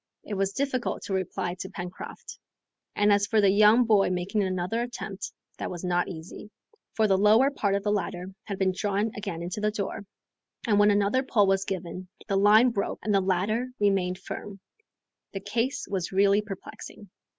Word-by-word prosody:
It 215 - -6
was 195 0 0
difficult 270 -3 -2
to 195 - -4
reply 185 -2 -2
to 190 - -5
Pencroft, 180 -1 -8 0.6
and 205 0 +4
as 205 0 +2
for 220 -1 +2
the 200 -2 +5
young 215 +4 +6
boy 210 -4 +4
making 185 +4 -1
another 185 +4 -1
attempt, 205 -5 -5 0.3
that - - -3
was 175 -1 -7
not 175 -1 +1
easy; 175 +4 -9 0.5
for 220 -1 +3
the 190 -2 +3
lower 220 +7 +5
part 200 -8 0
of 200 - -2
the 205 - +1
ladder 190 -2 -3
had 200 -2 -4
been 190 -1 +1
drawn 205 +2 0
again 195 -5 -5
into 180 +4 -4
the 210 - +2
door, 205 0 -4 0.6
and 205 -3 +3
when 205 0 +6
another 205 +5 +2
pull 235 -6 +2
was 195 0 +1
given, 185 -1 -5 0.2
the 195 - 0
line 215 +5 +6
broke 200 -3 -2
and 210 - 0
the 195 - +4
ladder 195 +6 0
remained 195 -3 +1
firm. 195 +1 -8 0.7
The 195 - -3
case 235 +6 -2
was 190 -4 -3
really 200 +1 +4
perplexing. 205 0 -9
200 Hz, 185 wpm, -27 LUFS, 190-215 Hz, 0.7 s, young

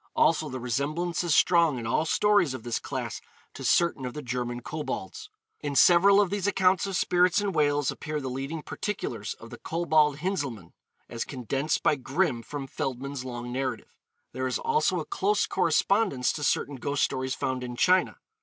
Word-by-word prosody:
Also, - - +3
the 130 - -5
resemblance 145 +9 -1
is 170 -3 +2
strong 170 -6 +4
in 115 - -5
all 130 +7 +1
stories 200 -5 +3
of 125 - -8
this 120 -1 -2
class - - -5 0.3
to - - -8
certain 170 -6 +2
of 125 -1 -5
the 150 - -6
German 120 -1 -3
Kobolds. 125 -8 -6 0.3
In 145 -1 -4
several 190 +7 +6
of 200 -3 +2
these 205 -1 -1
accounts 190 -1 +2
of 195 - -3
spirits 180 0 +3
in 205 -1 -1
Wales 145 -4 +1
appear 155 -1 -4
the 135 - -5
leading 135 +5 -4
particulars 210 - -4
of - - -13
the - - -9
Kobold 155 -3 +2
Hinzelmann, 145 - -3 0.3
as 115 -1 -4
condensed 135 +3 -2
by 150 - +3
Grimm 130 -2 0
from 140 +3 -6
Feldman's 135 +1 -4
long 120 -1 -6
narrative. 130 -2 -4 0.4
There 130 0 -2
is 130 - -1
also 460 0 +1
a - - -4
close 400 +1 +1
correspondence 195 - +1
to 150 - -5
certain 145 -1 0
ghost 140 +3 -1
stories 130 -1 -1
found 130 -1 -2
in 125 -1 -5
China. 185 +8 +3
145 Hz, 180 wpm, -27 LUFS, 130-175 Hz, 0.4 s, several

